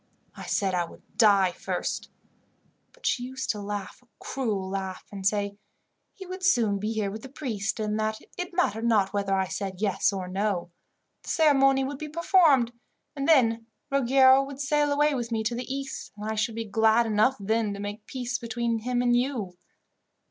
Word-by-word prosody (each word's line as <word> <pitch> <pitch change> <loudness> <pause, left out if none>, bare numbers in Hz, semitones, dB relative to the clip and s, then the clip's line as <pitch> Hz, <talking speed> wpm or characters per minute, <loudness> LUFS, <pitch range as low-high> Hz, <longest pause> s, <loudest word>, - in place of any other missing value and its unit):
I - - -9
said 195 -2 0
I 175 -1 +1
would - - -15
die 200 -4 +5
first, - - -4 0.8
but - - -17
she 245 - +1
used 260 +1 -3
to 210 - -6
laugh 205 0 -5
a 250 - -28
cruel 215 -8 -3
laugh, 190 -1 -4
and 195 -2 -2
say 200 0 -1 0.6
he 380 - -9
would 370 +1 -7
soon 230 - +3
be 210 +2 -2
here 215 -3 -1
with 215 +2 -7
the 265 - -10
priest, 230 -6 -3
and 215 0 -1
that 215 0 -1 0.2
it 360 0 -4
mattered 230 - 0
not 205 -4 +2
whether 200 -1 0
I 190 -1 0
said 190 -2 -4
yes 205 -1 +1
or 190 -2 -4
no. 185 -2 -2 0.5
The - - -11
ceremony 275 -4 +4
would 275 +1 -4
be 305 - -5
performed, 310 -7 +4 0.4
and 275 -1 -2
then 230 -7 +4 0.2
Ruggiero 265 0 +5
would 275 0 -8
sail 290 +1 +1
away 295 +1 +3
with 240 -3 -3
me 220 -1 0
to 225 +2 -1
the 245 +2 -5
East, 275 0 -5
and 210 - -6
I 220 - -1
should 220 +1 -1
be 230 0 -3
glad 220 +2 +3
enough 225 +4 +2
then 220 +1 0
to - - -8
make 205 +1 -6
peace 250 -1 -3
between 235 -1 -2
him 245 +2 -1
and 240 -1 +3
you. 240 -8 -1
225 Hz, 190 wpm, -27 LUFS, 205-270 Hz, 0.8 s, die